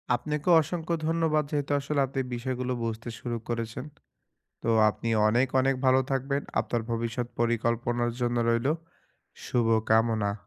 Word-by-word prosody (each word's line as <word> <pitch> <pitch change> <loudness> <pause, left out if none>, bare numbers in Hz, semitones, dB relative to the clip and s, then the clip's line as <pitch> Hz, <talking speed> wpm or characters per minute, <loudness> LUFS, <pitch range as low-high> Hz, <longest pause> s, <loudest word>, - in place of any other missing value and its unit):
আপনাকে 150 +5 -4
অসংখ্য 170 +2 -2
ধন্যবাদ 160 -2 +2
যেহেতু 145 -1 -1
আসলে 140 +1 -2
আপনি 135 0 -2
বিষয়গুলো 125 +1 -2
বুঝতে 115 +1 -4
শুরু 120 -2 -3
করেছেন। 115 +2 -4 0.8
তো - - -3 0.2
আপনি 115 - -5 0.2
অনেক, 120 +4 +3
অনেক 135 +1 +2
ভালো 130 0 +5
থাকবেন। 135 +1 -1 0.2
আপনার 120 -1 -2
ভবিষ্যৎ 115 +1 -2
পরিকল্পনার 120 +1 0
জন্য 120 0 0
রইলো 115 +5 +2 0.7
শুভকামনা। 110 -2 +2
120 Hz, 125 wpm, -27 LUFS, 115-140 Hz, 0.8 s, ভালো